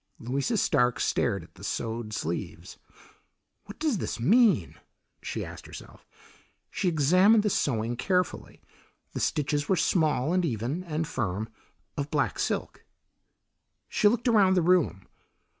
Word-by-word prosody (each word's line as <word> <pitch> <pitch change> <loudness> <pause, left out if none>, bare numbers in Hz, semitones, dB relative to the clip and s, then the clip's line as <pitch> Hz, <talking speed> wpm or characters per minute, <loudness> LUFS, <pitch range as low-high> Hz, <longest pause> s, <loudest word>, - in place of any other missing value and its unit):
Louisa 135 - -2
Stark 125 -9 +2
stared 100 -8 0
at 85 - -18
the 95 - -15
sewed 115 +1 -4
sleeves. 85 -5 -5 0.9
"What 205 - -11
does 300 - 0
this - - -4
mean?" 190 - +3 0.5
she - - -4
asked - - -10
herself. - - -12 0.6
She 195 - -2
examined 185 +8 +4
the 210 - +1
sewing 115 -6 0
carefully; 180 +7 -2 0.5
the - - -4
stitches 145 -1 -1
were 190 - +4
small, 155 -4 +1
and 185 0 +2
even, 135 - -2
and 160 -1 -2
firm, 110 - -3 0.5
of 145 0 -3
black - - -1
silk. - - -3 1.0
She 210 - +2
looked 235 +3 +1
around 200 -5 +4
the 180 - +2
room. 170 - +2
150 Hz, 135 wpm, -27 LUFS, 120-185 Hz, 1.0 s, examined